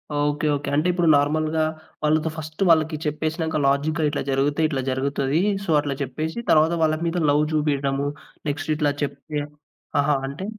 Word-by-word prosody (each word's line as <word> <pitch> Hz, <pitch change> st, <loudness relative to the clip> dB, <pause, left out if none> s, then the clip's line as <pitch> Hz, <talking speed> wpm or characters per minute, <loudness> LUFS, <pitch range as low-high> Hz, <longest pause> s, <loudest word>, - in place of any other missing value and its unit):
Okay. 145 Hz, +1 st, 0 dB
Okay. 140 Hz, -, -4 dB
అంటే 155 Hz, +5 st, +2 dB
ఇప్పుడు 175 Hz, -2 st, +1 dB
నార్మల్‌గా 155 Hz, +2 st, +1 dB, 0.4 s
వాళ్ళతో 155 Hz, +1 st, +2 dB
ఫస్ట్ 155 Hz, +3 st, -8 dB
వాళ్ళకి 160 Hz, -1 st, +4 dB
చెప్పేసినంక 160 Hz, +1 st, -1 dB
లాజిక్‌గా 150 Hz, +3 st, +1 dB
ఇట్లా 145 Hz, -, -2 dB
జరిగితే 145 Hz, +3 st, +1 dB
ఇట్లా 135 Hz, -3 st, -1 dB
జరుగుతది. 140 Hz, +3 st, 0 dB, 0.2 s
సో, 175 Hz, -, -8 dB
అట్లా 140 Hz, -2 st, -3 dB
చెప్పేశి 155 Hz, -, -4 dB
తరువాత 160 Hz, +2 st, +5 dB
వాళ్ళ 155 Hz, 0 st, +2 dB
మీద 170 Hz, +2 st, -1 dB
లవ్ 145 Hz, +1 st, +3 dB
చూపియడము 140 Hz, -2 st, 0 dB, 0.4 s
నెక్స్ట్ 145 Hz, +2 st, -3 dB
ఇట్లా 150 Hz, -2 st, +1 dB
చెప్తే 145 Hz, +1 st, -4 dB, 0.6 s
ఆహా! 145 Hz, +1 st, +3 dB
అంటే? 140 Hz, +8 st, -6 dB
150 Hz, 155 wpm, -23 LUFS, 145-155 Hz, 0.6 s, తరువాత